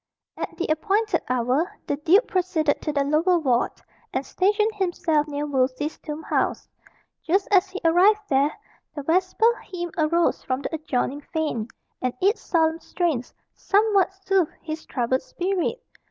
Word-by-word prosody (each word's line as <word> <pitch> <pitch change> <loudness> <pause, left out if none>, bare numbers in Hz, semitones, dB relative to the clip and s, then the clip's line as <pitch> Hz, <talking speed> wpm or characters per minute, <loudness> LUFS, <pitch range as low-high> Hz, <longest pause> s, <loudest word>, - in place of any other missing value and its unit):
At - - -6
the 350 - -1
appointed 395 +5 +1
hour 255 - +1
the - - -1
duke 335 +10 +4
proceeded 345 -5 0
to 305 - -2
the 285 -1 +1
lower 315 +6 +3
ward, 255 -7 +1 0.4
and 265 +1 -2
stationed 420 +3 +1
himself 350 -6 0
near 290 0 -3
Wolsey's 270 +1 -1
tomb 305 +1 -6
house. - - -1 0.5
Just 385 +4 +1
as 385 -1 +4
he 380 +1 -6
arrived 380 +6 +5
there, 280 +1 +3 0.4
the 290 - -5
vesper 370 +9 +2
hymn 350 -2 -6
arose 335 +2 +2
from 260 +2 -3
the - - -4
adjoining 290 -2 -2
fane, 300 -8 -2 0.3
and 255 -1 -1
its 405 +5 +2
solemn 320 -1 +1
strains 325 -9 -2 0.2
somewhat 400 -2 +2
soothed 380 -4 +2
his 315 -1 -6
troubled 255 +1 0
spirit. 390 +6 -2
325 Hz, 150 wpm, -24 LUFS, 290-375 Hz, 0.5 s, arrived